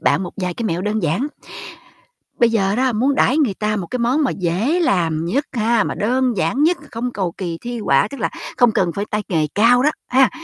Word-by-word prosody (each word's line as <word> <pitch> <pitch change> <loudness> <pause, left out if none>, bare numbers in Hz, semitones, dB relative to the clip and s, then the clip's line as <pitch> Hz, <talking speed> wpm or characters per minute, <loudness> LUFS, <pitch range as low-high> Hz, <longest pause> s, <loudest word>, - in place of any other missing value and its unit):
bạn - - +2
một 180 - -6
vài 180 -2 -3
cái 230 - -4
mẹo 175 -3 -1
đơn 210 -1 -1
giản. 170 - 0 1.1
Bây 235 -1 +4
giờ 200 -2 +1
đó, 255 -1 +2
muốn 260 +6 +1
đãi 270 +2 +2
người 260 -10 +1
ta 210 +2 -1
một 180 -4 -4
cái 250 - -4
món 255 +6 +1
mà - - +1
dễ 200 - 0
làm 165 - +1
nhất 270 - 0
ha, 230 -1 +2
mà - - -3
đơn 255 +4 +1
giản 255 +8 0
nhất, 340 +3 +3
không 235 +2 -3
cầu 185 -6 -2
kỳ 170 -3 -5
thi 240 0 -5
họa, 170 -1 +2
tức 280 - -8
là - - 0 0.3
không 245 -2 +4
cần 180 -4 +1
phải 200 - -3
tay 210 0 -1
nghề 160 -5 +1
cao 240 +4 +4
đó, 300 - +4 0.2
ha, 260 +1 +4
220 Hz, 235 wpm, -19 LUFS, 185-255 Hz, 1.1 s, Bây